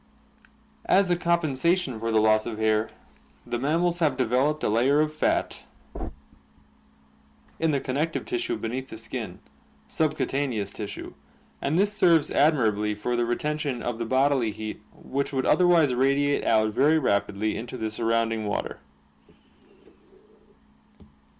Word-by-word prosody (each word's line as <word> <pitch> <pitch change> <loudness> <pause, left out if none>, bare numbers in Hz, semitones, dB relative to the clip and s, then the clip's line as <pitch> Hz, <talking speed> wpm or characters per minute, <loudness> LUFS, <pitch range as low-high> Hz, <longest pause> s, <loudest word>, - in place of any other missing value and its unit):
As 190 -2 +3
a - - +4
compensation 170 -4 0
for 115 +1 -2
the 110 - +3
loss 110 0 +3
of 110 -2 -5
hair, 110 0 +1 0.6
the 120 - -3
mammals 170 +6 +1
have 150 -6 +1
de 130 - +1
veloped 135 +6 +1
a - - +2
layer 125 +7 +3
of 155 0 +1
fai 155 - +1 2.2
in 165 - +1
the 140 -2 +1
connective 145 +6 -2
tissue 355 -1 -2
beneath 130 +3 -4
the 110 - -8
skin 110 -4 -6 0.5
(subcutaneous 135 -9 -1
tissue) 105 -1 -7 0.5
and 145 +4 0
this 205 +2 +2
serves 170 -7 +3
admirably 110 -8 +2
for 120 +4 -2
the 120 0 +1
retention 145 +1 -2
of 120 -1 -3
the 115 - -2
bodily 130 -2 +2
heat 110 0 -6
which 140 +1 -4
would 130 -2 -1
otherwise 170 -6 +4
radiate 140 +3 +1
out 110 -1 +2
very 145 +7 +4
rapidly 105 -5 0
into 120 +2 -6
the 110 -2 -3
surrounding 115 -1 0
water. 100 - -3
130 Hz, 135 wpm, -26 LUFS, 110-155 Hz, 2.2 s, a